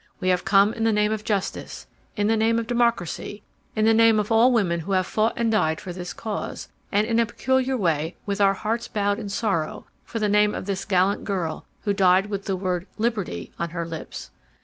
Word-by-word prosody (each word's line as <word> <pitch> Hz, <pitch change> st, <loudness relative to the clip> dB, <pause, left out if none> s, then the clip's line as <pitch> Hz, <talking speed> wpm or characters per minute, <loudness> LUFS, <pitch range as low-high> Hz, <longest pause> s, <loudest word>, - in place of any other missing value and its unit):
We 185 Hz, -3 st, 0 dB
have 180 Hz, -1 st, +2 dB
come 200 Hz, +2 st, +4 dB
in 225 Hz, -, -3 dB
the 225 Hz, -, +3 dB
name 210 Hz, 0 st, +2 dB
of 215 Hz, -1 st, -2 dB
justice, 200 Hz, -3 st, -3 dB, 0.3 s
in 205 Hz, -, 0 dB
the 225 Hz, +2 st, +3 dB
name 225 Hz, +1 st, +2 dB
of 230 Hz, -, -1 dB
democracy, 235 Hz, -4 st, -1 dB, 0.3 s
in 215 Hz, -1 st, +2 dB
the 225 Hz, -, +5 dB
name 225 Hz, -1 st, +5 dB
of 210 Hz, +1 st, -2 dB
all 230 Hz, +3 st, +5 dB
women 190 Hz, -8 st, +1 dB
who 195 Hz, +4 st, -3 dB
have 185 Hz, -1 st, +2 dB
fought 220 Hz, +4 st, +1 dB
and 230 Hz, -1 st, +1 dB
died 160 Hz, -7 st, +1 dB
for 180 Hz, -, -7 dB
this 180 Hz, 0 st, -6 dB
cause, 215 Hz, +1 st, -5 dB, 0.2 s
and 205 Hz, +1 st, +2 dB
in 230 Hz, 0 st, +1 dB
a 230 Hz, -, +4 dB
peculiar 260 Hz, +2 st, 0 dB
way 165 Hz, -4 st, 0 dB
with 200 Hz, 0 st, -2 dB
our 195 Hz, 0 st, +4 dB
hearts 225 Hz, +4 st, -2 dB
bowed 205 Hz, 0 st, 0 dB
in 210 Hz, -3 st, -5 dB
sorrow, 195 Hz, -7 st, -2 dB, 0.3 s
in 225 Hz, -, -2 dB
the 210 Hz, -, +2 dB
name 210 Hz, 0 st, +3 dB
of -, -, -5 dB
this 195 Hz, -1 st, -3 dB
gallant 190 Hz, 0 st, +2 dB
girl 175 Hz, -6 st, -3 dB
who 205 Hz, -, 0 dB
died 190 Hz, +1 st, +3 dB
with 200 Hz, -1 st, -3 dB
the 195 Hz, -, -1 dB
word 185 Hz, 0 st, -2 dB
'liberty' 215 Hz, -, -2 dB
on 170 Hz, -, -2 dB
her 170 Hz, 0 st, -4 dB
lips. 165 Hz, -1 st, -8 dB
205 Hz, 220 wpm, -24 LUFS, 185-225 Hz, 0.3 s, the